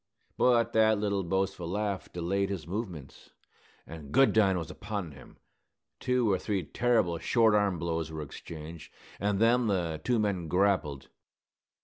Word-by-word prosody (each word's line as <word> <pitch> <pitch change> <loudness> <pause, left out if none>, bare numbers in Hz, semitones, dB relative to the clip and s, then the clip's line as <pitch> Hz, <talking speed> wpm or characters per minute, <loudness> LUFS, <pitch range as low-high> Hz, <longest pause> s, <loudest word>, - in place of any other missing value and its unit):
But 120 -2 +3
that 110 -1 +4
little 100 -1 0
boastful 95 -1 -2
laugh 100 0 -3
delayed 95 +3 -1
his 95 -4 -4
movements, 90 - -6 0.6
and 80 -4 -10
Goodine 110 - +4
was 85 - -5
upon 100 -5 -5
him. 65 -2 -15 0.6
Two 125 -4 +1
or 95 - +1
three 100 -4 -2
terrible 110 -3 +1
short 115 +2 +3
arm 100 -3 +2
blows 80 -1 -3
were 80 -1 -5
exchanged, 75 +2 -9 0.3
and 100 0 0
then 120 +1 +3
the 85 -6 -1
two 125 - +1
men 100 -6 -1
grappled. 85 -7 0
95 Hz, 140 wpm, -29 LUFS, 85-105 Hz, 0.6 s, that